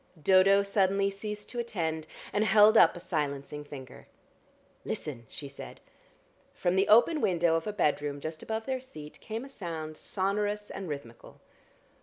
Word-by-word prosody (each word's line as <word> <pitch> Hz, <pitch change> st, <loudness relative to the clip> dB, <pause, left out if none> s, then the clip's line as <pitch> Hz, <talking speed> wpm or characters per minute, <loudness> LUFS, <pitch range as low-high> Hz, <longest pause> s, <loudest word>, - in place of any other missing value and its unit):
Dodo 190 Hz, +4 st, +5 dB
suddenly 195 Hz, 0 st, +2 dB
ceased 210 Hz, +1 st, -6 dB
to 240 Hz, -, -5 dB
attend, 160 Hz, -9 st, -3 dB, 0.3 s
and 205 Hz, -, +2 dB
held 215 Hz, +1 st, +6 dB
up 170 Hz, -6 st, +7 dB
a -, -, -7 dB
silencing 150 Hz, -4 st, -3 dB
finger. 135 Hz, -3 st, -11 dB, 0.8 s
"Listen!" 120 Hz, -6 st, -5 dB
she 145 Hz, -, -7 dB
said. 140 Hz, -, -10 dB, 0.8 s
From 175 Hz, +1 st, 0 dB
the 190 Hz, +1 st, +3 dB
open 280 Hz, +8 st, +5 dB
window 170 Hz, -3 st, +2 dB
of 165 Hz, +3 st, 0 dB
a -, -, 0 dB
bedroom 145 Hz, -7 st, 0 dB
just 155 Hz, +2 st, -6 dB
above 220 Hz, 0 st, -4 dB
their 260 Hz, -1 st, -2 dB
seat 155 Hz, -, -10 dB
came 225 Hz, +3 st, -5 dB
a -, -, -9 dB
sound 165 Hz, -, -6 dB
sonorous 205 Hz, +4 st, -2 dB
and 190 Hz, -3 st, -6 dB
rhythmical. 140 Hz, -6 st, -8 dB
185 Hz, 155 wpm, -29 LUFS, 155-210 Hz, 0.8 s, up